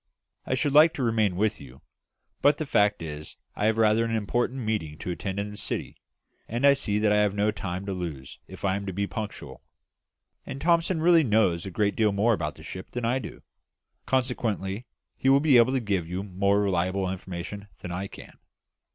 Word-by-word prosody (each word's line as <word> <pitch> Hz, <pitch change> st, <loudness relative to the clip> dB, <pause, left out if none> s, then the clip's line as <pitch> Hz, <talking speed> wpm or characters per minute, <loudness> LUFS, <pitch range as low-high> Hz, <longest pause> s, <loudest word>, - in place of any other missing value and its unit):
I 130 Hz, -, +1 dB
should 140 Hz, +2 st, 0 dB
like 155 Hz, +3 st, +7 dB
to 135 Hz, -, -2 dB
remain 110 Hz, -5 st, +1 dB
with 105 Hz, 0 st, 0 dB
you; 65 Hz, -1 st, -13 dB, 0.6 s
but 145 Hz, +1 st, +4 dB
the 155 Hz, -, -3 dB
fact 105 Hz, -, +2 dB
is 75 Hz, -1 st, -7 dB, 0.2 s
that -, -, -7 dB
I -, -, +2 dB
have 110 Hz, 0 st, +1 dB
rather 110 Hz, 0 st, +4 dB
an 115 Hz, -, -2 dB
important 120 Hz, +5 st, -1 dB
meeting 105 Hz, -10 st, -2 dB
to 90 Hz, -, -5 dB
attend 95 Hz, +3 st, -4 dB
in 105 Hz, +1 st, -3 dB
the 105 Hz, -, -9 dB
City; -, -, -4 dB, 0.5 s
and 120 Hz, +5 st, -1 dB
I 140 Hz, -, +8 dB
see 105 Hz, -7 st, -1 dB
that 105 Hz, 0 st, +2 dB
I 105 Hz, -, +4 dB
have 105 Hz, -1 st, +1 dB
no 105 Hz, +1 st, +2 dB
time 95 Hz, -2 st, -5 dB
to 100 Hz, -, -3 dB
lose 75 Hz, -8 st, -6 dB
if -, -, -8 dB
I 95 Hz, -1 st, +2 dB
am 100 Hz, 0 st, -5 dB
to 95 Hz, -, -3 dB
be 100 Hz, +3 st, -1 dB
punctual. 105 Hz, 0 st, -7 dB, 0.8 s
And 135 Hz, 0 st, -7 dB
Thomson 165 Hz, +1 st, +2 dB
really 170 Hz, -1 st, +6 dB
knows 105 Hz, -, +2 dB
a -, -, -3 dB
great 100 Hz, +2 st, 0 dB
deal 110 Hz, -2 st, +3 dB
more 105 Hz, +4 st, +2 dB
about 75 Hz, -7 st, -2 dB
the 80 Hz, -, -13 dB
ship 95 Hz, +3 st, -8 dB
than 125 Hz, -1 st, -4 dB
I 125 Hz, +3 st, +1 dB
do; 120 Hz, -, -9 dB, 0.6 s
consequently 120 Hz, -5 st, -1 dB, 0.3 s
he 135 Hz, -, +1 dB
will 135 Hz, +1 st, +6 dB
be 145 Hz, -3 st, +5 dB
able 120 Hz, +3 st, +4 dB
to 135 Hz, -, +2 dB
give 100 Hz, -7 st, -1 dB
you 90 Hz, +2 st, -3 dB
more 100 Hz, +1 st, +1 dB
reliable 95 Hz, 0 st, 0 dB
information 95 Hz, +2 st, -6 dB
than 90 Hz, -, -6 dB
I 95 Hz, +3 st, -3 dB
can." -, -, -13 dB
105 Hz, 210 wpm, -26 LUFS, 95-120 Hz, 0.8 s, I